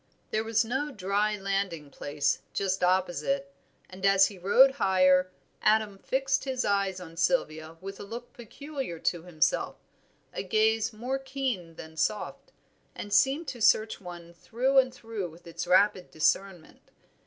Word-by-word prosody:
There 215 Hz, -, 0 dB
was 225 Hz, 0 st, +1 dB
no 265 Hz, +6 st, -2 dB
dry 205 Hz, -1 st, 0 dB
landing 195 Hz, -7 st, -3 dB
place 145 Hz, 0 st, -1 dB
just 190 Hz, -1 st, -1 dB
opposite, 190 Hz, +10 st, 0 dB, 0.3 s
and 185 Hz, +1 st, -12 dB
as 195 Hz, 0 st, +5 dB
he 200 Hz, -3 st, -12 dB
rowed 250 Hz, +9 st, +6 dB
higher, 185 Hz, -1 st, +4 dB, 0.3 s
Adam 215 Hz, -2 st, +2 dB
fixed 270 Hz, +4 st, 0 dB
his 260 Hz, -2 st, -2 dB
eyes 200 Hz, -2 st, 0 dB
on 165 Hz, -2 st, -11 dB
Sylvia 160 Hz, -5 st, 0 dB
with 195 Hz, +1 st, -8 dB
a -, -, -6 dB
look 235 Hz, +4 st, -8 dB
peculiar 265 Hz, -, -7 dB
to 170 Hz, +1 st, -1 dB
himself, 160 Hz, -4 st, 0 dB, 0.6 s
a -, -, -3 dB
gaze 220 Hz, +3 st, +1 dB
more 250 Hz, +5 st, -3 dB
keen 260 Hz, -11 st, -4 dB
than 160 Hz, 0 st, -11 dB
soft, 215 Hz, -, -2 dB, 0.5 s
which 205 Hz, -, -6 dB
seemed 280 Hz, +8 st, +3 dB
to 240 Hz, -, -8 dB
search 220 Hz, 0 st, +3 dB
one 175 Hz, -2 st, -10 dB
through 255 Hz, +9 st, +1 dB
and 255 Hz, -1 st, +2 dB
through 225 Hz, -7 st, -6 dB
with 165 Hz, +2 st, -17 dB
its 170 Hz, +1 st, -6 dB
rapid 185 Hz, 0 st, +3 dB
discernment. 175 Hz, +2 st, -1 dB
200 Hz, 150 wpm, -28 LUFS, 180-240 Hz, 0.6 s, rowed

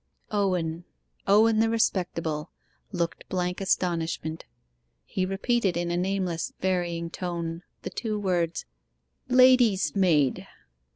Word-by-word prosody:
Owen 180 Hz, -5 st, 0 dB, 0.4 s
Owen 215 Hz, +2 st, +5 dB
the 225 Hz, 0 st, +3 dB
respectable 170 Hz, -8 st, -1 dB, 0.4 s
looked 170 Hz, -4 st, -3 dB
blank 180 Hz, 0 st, -2 dB
astonishment. 165 Hz, -4 st, -1 dB, 0.6 s
He 185 Hz, -, -2 dB
repeated 195 Hz, -1 st, 0 dB
in 175 Hz, 0 st, -1 dB
a -, -, 0 dB
nameless, 180 Hz, -2 st, -1 dB
varying 175 Hz, -3 st, -1 dB
tone, 170 Hz, -2 st, -4 dB, 0.2 s
the -, -, -5 dB
two 215 Hz, -3 st, -3 dB
words 175 Hz, -4 st, -1 dB, 0.6 s
'Lady's 250 Hz, -6 st, +5 dB
maid! 160 Hz, -9 st, +2 dB
180 Hz, 105 wpm, -27 LUFS, 170-200 Hz, 0.6 s, Owen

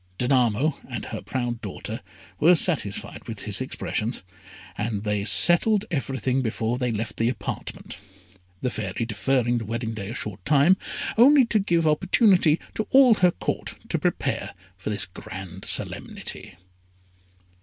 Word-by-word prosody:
Danamo 125 Hz, +3 st, +1 dB
and 120 Hz, -3 st, -5 dB
her 110 Hz, -, -6 dB
proud 120 Hz, -2 st, -3 dB
daughter 110 Hz, +2 st, -6 dB, 0.4 s
were 175 Hz, +4 st, +6 dB
satisfied 150 Hz, -, -1 dB
with -, -, -6 dB
his -, -, 0 dB
expressions, 110 Hz, -1 st, -3 dB, 0.5 s
and 105 Hz, -1 st, -2 dB
they 105 Hz, -1 st, -1 dB
settled 195 Hz, -, +4 dB
everything 135 Hz, -3 st, -1 dB
before 115 Hz, 0 st, -2 dB
they 125 Hz, -2 st, 0 dB
left 110 Hz, -1 st, -4 dB
the 115 Hz, +1 st, +2 dB
apartment, 105 Hz, -5 st, -6 dB, 0.6 s
the 125 Hz, -, -1 dB
Fairy 110 Hz, +1 st, -3 dB
deferring 120 Hz, +2 st, 0 dB
the 115 Hz, -, -6 dB
wedding 115 Hz, +1 st, -3 dB
day 100 Hz, -2 st, -6 dB
a 115 Hz, -, -6 dB
short 100 Hz, -8 st, -4 dB
time, 150 Hz, -, +5 dB, 0.4 s
only 270 Hz, +2 st, +7 dB
to 230 Hz, -2 st, +1 dB
give 170 Hz, -4 st, +1 dB
opportunity 175 Hz, 0 st, +4 dB
to 215 Hz, -, -3 dB
all 265 Hz, -3 st, +7 dB
her 185 Hz, -4 st, +4 dB
Court -, -, -4 dB
to -, -, 0 dB
prepare -, -, -2 dB, 0.2 s
for 95 Hz, +3 st, -6 dB
this 105 Hz, -, +2 dB
grand 95 Hz, 0 st, -9 dB
solemnity. -, -, -2 dB
120 Hz, 145 wpm, -24 LUFS, 110-165 Hz, 0.6 s, only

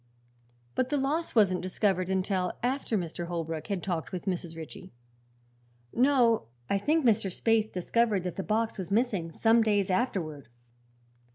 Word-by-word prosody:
"But 255 Hz, 0 st, 0 dB
the 290 Hz, -, +1 dB
loss 290 Hz, +4 st, -1 dB
wasn't 190 Hz, -5 st, +4 dB
discovered 185 Hz, 0 st, 0 dB
until 190 Hz, -1 st, 0 dB
after 250 Hz, -3 st, 0 dB
Mr. 170 Hz, -1 st, -4 dB
Holbrook 165 Hz, -2 st, -4 dB
had 195 Hz, -4 st, -2 dB
talked 165 Hz, -8 st, -3 dB
with 180 Hz, 0 st, -5 dB
Mrs. 175 Hz, -3 st, -3 dB
Ritchie?" 160 Hz, -2 st, -9 dB, 1.0 s
"No. 245 Hz, -, +3 dB, 0.2 s
I 200 Hz, -, +1 dB
think 305 Hz, +7 st, +1 dB
Mr. 220 Hz, -3 st, +3 dB
Spaythe 220 Hz, +3 st, +1 dB
discovered 205 Hz, +2 st, +1 dB
that 180 Hz, -2 st, -4 dB
the -, -, -2 dB
box 220 Hz, +2 st, -1 dB
was 185 Hz, -, -4 dB
missing 200 Hz, -6 st, 0 dB
some 225 Hz, +6 st, +4 dB
days 205 Hz, -3 st, +2 dB
afterward." 175 Hz, -, -1 dB
200 Hz, 150 wpm, -29 LUFS, 180-230 Hz, 1.0 s, wasn't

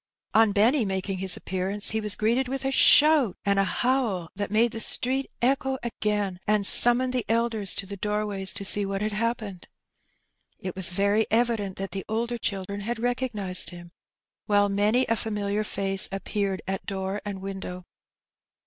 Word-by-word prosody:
On 220 Hz, -1 st, +4 dB
Benny 230 Hz, +7 st, +3 dB
making 190 Hz, -1 st, -3 dB
his 190 Hz, -1 st, +2 dB
appearance, 190 Hz, +2 st, -2 dB
he 220 Hz, 0 st, -1 dB
was 210 Hz, -2 st, 0 dB
greeted 235 Hz, +4 st, 0 dB
with 270 Hz, +1 st, -4 dB
a 270 Hz, -, 0 dB
shout 290 Hz, -, +5 dB
and 200 Hz, 0 st, +2 dB
a -, -, +4 dB
howl 225 Hz, -7 st, -1 dB
that 205 Hz, +1 st, -3 dB
made 220 Hz, +3 st, +2 dB
the 225 Hz, -, -5 dB
street 260 Hz, +4 st, +2 dB
echo 265 Hz, +1 st, +1 dB
again, 210 Hz, -5 st, -2 dB
and 210 Hz, -1 st, +2 dB
summoned 245 Hz, +4 st, +6 dB
the 250 Hz, -2 st, 0 dB
elders 225 Hz, -3 st, 0 dB
to 195 Hz, -, -3 dB
the 200 Hz, +1 st, -8 dB
doorways 210 Hz, -1 st, -2 dB
to 200 Hz, -, -6 dB
see 205 Hz, +1 st, +6 dB
what 195 Hz, +1 st, -3 dB
had 215 Hz, -, -1 dB
hap 230 Hz, +3 st, -1 dB
pened. 200 Hz, -6 st, -9 dB, 0.9 s
It 185 Hz, -1 st, -7 dB
was 190 Hz, -2 st, -2 dB
very 200 Hz, +4 st, +1 dB
evident 225 Hz, -4 st, 0 dB
that 195 Hz, -1 st, -5 dB
the 195 Hz, 0 st, -5 dB
older 235 Hz, +2 st, -2 dB
children 200 Hz, -1 st, -3 dB
had 230 Hz, +4 st, -4 dB
recog> 245 Hz, +2 st, -2 dB
nized 190 Hz, -3 st, +1 dB
him, 175 Hz, -1 st, -12 dB, 0.6 s
while 205 Hz, -1 st, +3 dB
many 210 Hz, +6 st, +2 dB
a 230 Hz, -, +1 dB
familiar 210 Hz, -1 st, -2 dB
face 195 Hz, -1 st, 0 dB
appeared 195 Hz, 0 st, -3 dB
at 190 Hz, 0 st, -4 dB
door 195 Hz, +1 st, -4 dB
and 205 Hz, -2 st, -6 dB
window. 190 Hz, -2 st, -7 dB
205 Hz, 175 wpm, -25 LUFS, 195-230 Hz, 0.9 s, summoned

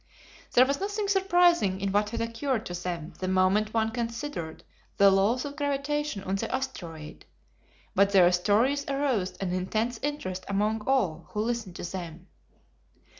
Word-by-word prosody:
There 255 Hz, -, +7 dB
was 280 Hz, +1 st, -1 dB
nothing 410 Hz, +1 st, -2 dB
surprising 350 Hz, -, +3 dB
in 195 Hz, 0 st, -1 dB
what 205 Hz, +1 st, +2 dB
had 230 Hz, -, -3 dB
occurred 230 Hz, +1 st, -2 dB
to 175 Hz, -, -5 dB
them 170 Hz, -2 st, -4 dB
the 185 Hz, -, -2 dB
moment 190 Hz, +3 st, +2 dB
one 225 Hz, 0 st, +1 dB
considered 230 Hz, -, -4 dB, 0.3 s
the 200 Hz, 0 st, +7 dB
laws 205 Hz, +7 st, +2 dB
of 285 Hz, 0 st, -6 dB
gravitation 285 Hz, -4 st, -2 dB
on 195 Hz, +1 st, -1 dB
the -, -, -3 dB
asteroid, 170 Hz, -, -5 dB, 0.7 s
but 200 Hz, +1 st, +4 dB
their 180 Hz, -3 st, +6 dB
stories 220 Hz, +10 st, +2 dB
aroused 275 Hz, -9 st, -1 dB
an 185 Hz, -2 st, -2 dB
intense 220 Hz, +6 st, -1 dB
interest 190 Hz, -11 st, -3 dB
among 210 Hz, +2 st, 0 dB
all 190 Hz, -12 st, +1 dB
who 210 Hz, -, -1 dB
listened 225 Hz, -5 st, -3 dB
to -, -, -7 dB
them. 175 Hz, -1 st, -6 dB
215 Hz, 155 wpm, -28 LUFS, 185-270 Hz, 0.7 s, There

